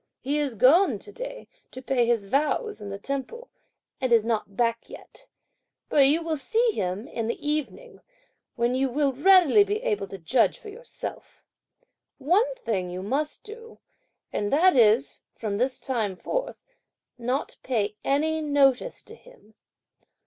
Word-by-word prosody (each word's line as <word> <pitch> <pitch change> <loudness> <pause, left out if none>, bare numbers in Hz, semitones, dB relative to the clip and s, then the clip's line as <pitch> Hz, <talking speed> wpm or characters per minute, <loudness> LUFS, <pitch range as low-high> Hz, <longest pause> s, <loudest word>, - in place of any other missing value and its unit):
He 285 +3 -1
is 280 -5 -2
gone 310 - +5
to - - -12
day - - -8 0.2
to - - -10
pay 255 -2 0
his 230 -4 +1
vows 300 - -1
in 205 - -7
the 195 - -5
temple, 275 - -6 0.5
and 255 -2 -1
is 225 -2 +4
not 215 -4 -2
back 230 -1 0
yet, - - -13 0.6
but 275 -2 +5
you 315 +4 +3
will 320 -1 -2
see 455 - +1
him 195 - -3
in 230 -7 -4
the 235 - -2
evening, 305 - -3 0.5
when 240 0 0
you 265 +1 +1
will 275 +1 0
readily 370 +5 +6
be 415 +3 -3
able 425 - -1
to 195 - -8
judge 225 +8 +1
for 435 - -11
yourself. 475 +4 -9 0.7
One 395 - +1
thing 195 - -3
you 180 +1 -6
must 280 +9 -2
do, 455 +2 -12 0.6
and 205 - -2
that 350 +5 +4
is, 235 +2 +3
from 210 -2 -3
this 255 +1 0
time 220 -7 -2
forth, - - -4 0.6
not 250 +4 -2
to - - -18
pay 215 -5 -2
any 315 +3 0
notice 285 - +1
to 445 - -13
him. 470 - -19
275 Hz, 160 wpm, -25 LUFS, 230-380 Hz, 0.7 s, readily